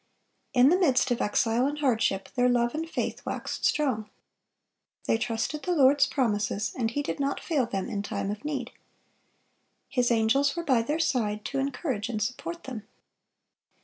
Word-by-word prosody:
(433) 245 Hz, -, +6 dB
In 265 Hz, -, +8 dB
the 355 Hz, -, +5 dB
midst 260 Hz, -1 st, +2 dB
of 240 Hz, -, 0 dB
exile 230 Hz, +4 st, +2 dB
and 290 Hz, +1 st, -3 dB
hardship, 225 Hz, -8 st, +1 dB
their 250 Hz, -1 st, +3 dB
love 240 Hz, -1 st, +2 dB
and 325 Hz, +2 st, -3 dB
faith -, -, -3 dB
waxed -, -, -4 dB
strong. 240 Hz, -8 st, +1 dB, 1.0 s
They 225 Hz, -, +2 dB
trusted 240 Hz, +6 st, -2 dB
the 360 Hz, -, -1 dB
Lord's 275 Hz, -1 st, +5 dB
promises, 210 Hz, -6 st, 0 dB
and 230 Hz, -3 st, 0 dB
He 285 Hz, +5 st, -2 dB
did -, -, -4 dB
not 280 Hz, 0 st, -1 dB
fail 285 Hz, -8 st, 0 dB
them 195 Hz, -4 st, -3 dB
in 200 Hz, -, -3 dB
time 200 Hz, 0 st, -3 dB
of 210 Hz, +4 st, -6 dB
need. 275 Hz, -5 st, -3 dB, 1.2 s
His 250 Hz, -2 st, +1 dB
angels 240 Hz, +6 st, +2 dB
were 340 Hz, -, -3 dB
by 260 Hz, -7 st, +3 dB
their 295 Hz, +7 st, -1 dB
side, 220 Hz, -9 st, 0 dB
to 275 Hz, -, -2 dB
encourage 265 Hz, -5 st, -2 dB
and 220 Hz, -3 st, -2 dB
support 335 Hz, +9 st, -4 dB
them. 235 Hz, -5 st, -7 dB
250 Hz, 175 wpm, -27 LUFS, 225-280 Hz, 1.2 s, In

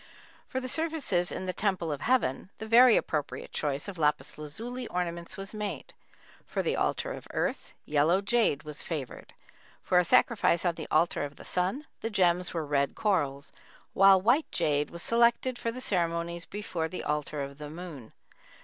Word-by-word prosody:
For 260 Hz, -, -2 dB
the 255 Hz, -, -5 dB
services 300 Hz, -, -1 dB
in 185 Hz, -, -4 dB
the 185 Hz, -, -2 dB
Temple 185 Hz, -6 st, -1 dB
of 145 Hz, -1 st, -4 dB
Heaven, 225 Hz, -, +1 dB
the 220 Hz, -, -6 dB
very 235 Hz, +2 st, +7 dB
appropriate 145 Hz, -4 st, -3 dB
choice 145 Hz, -1 st, -2 dB
of 190 Hz, -4 st, -7 dB
lapis 150 Hz, -1 st, +1 dB
lazuli 230 Hz, +12 st, -5 dB
ornaments 170 Hz, +1 st, -3 dB
was 195 Hz, +2 st, -7 dB
made; 205 Hz, -8 st, -5 dB, 0.5 s
for -, -, -2 dB
the -, -, 0 dB
Altar -, -, 0 dB
of -, -, -9 dB
Earth, -, -, -2 dB
yellow 155 Hz, +5 st, +3 dB
jade 200 Hz, -, +1 dB
was 150 Hz, -1 st, -6 dB
favored; 145 Hz, -7 st, -6 dB, 0.5 s
for 180 Hz, -, +4 dB
a -, -, +4 dB
sacrifice 205 Hz, -5 st, +3 dB
on 175 Hz, -, +3 dB
the 160 Hz, -1 st, -7 dB
Altar 155 Hz, 0 st, +2 dB
of 145 Hz, 0 st, -6 dB
the -, -, -13 dB
Sun, 190 Hz, +12 st, -1 dB
the 225 Hz, -, -3 dB
gems 180 Hz, -3 st, +2 dB
were 165 Hz, -3 st, -2 dB
red 140 Hz, -1 st, 0 dB
corals, 145 Hz, -9 st, 0 dB, 0.4 s
while 195 Hz, 0 st, +7 dB
white 245 Hz, -, +2 dB
jade 145 Hz, -1 st, +1 dB
was 170 Hz, 0 st, -6 dB
selected 235 Hz, +2 st, +3 dB
for 230 Hz, -, -1 dB
the 250 Hz, -, -7 dB
ceremonies 170 Hz, -3 st, -1 dB
before 185 Hz, -5 st, -3 dB
the 180 Hz, -, -6 dB
Altar 150 Hz, -1 st, -2 dB
of 140 Hz, +1 st, -8 dB
the 150 Hz, -1 st, -6 dB
Moon. 160 Hz, -7 st, -9 dB
175 Hz, 175 wpm, -29 LUFS, 150-215 Hz, 0.5 s, very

